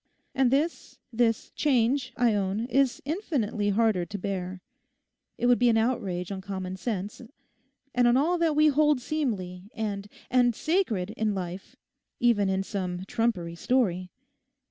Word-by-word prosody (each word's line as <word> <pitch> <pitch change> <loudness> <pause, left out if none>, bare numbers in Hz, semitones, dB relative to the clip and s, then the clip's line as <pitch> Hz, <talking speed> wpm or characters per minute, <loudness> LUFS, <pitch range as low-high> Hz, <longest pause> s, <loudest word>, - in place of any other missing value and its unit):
And 265 -2 +3
this—this 245 -5 -1
change, 255 -1 +1
I 240 -2 +3
own, 200 +2 -1
is 265 0 +1
infinitely 260 - -1
harder 210 -3 +2
to 200 +4 -6
bear. 185 -2 -4 0.7
It 245 - -1
would 245 0 +5
be 245 0 +4
an 225 - +3
outrage 205 -7 -1
on 190 -1 -4
common 190 -1 -5
sense 200 +1 -4 0.7
and 245 -1 +4
on 240 +1 +5
all 335 +6 +2
that 325 -3 +2
we 305 +1 +5
hold 295 -1 +3
seemly 205 -10 -3
and—and 220 +3 -1
sacred 240 - 0
in 215 -2 -1
life, 180 0 -6 0.4
even 220 -5 +3
in 190 0 0
some 185 -2 -4
trumpery 195 -6 -1
story. 185 -4 0
225 Hz, 140 wpm, -27 LUFS, 190-255 Hz, 0.7 s, would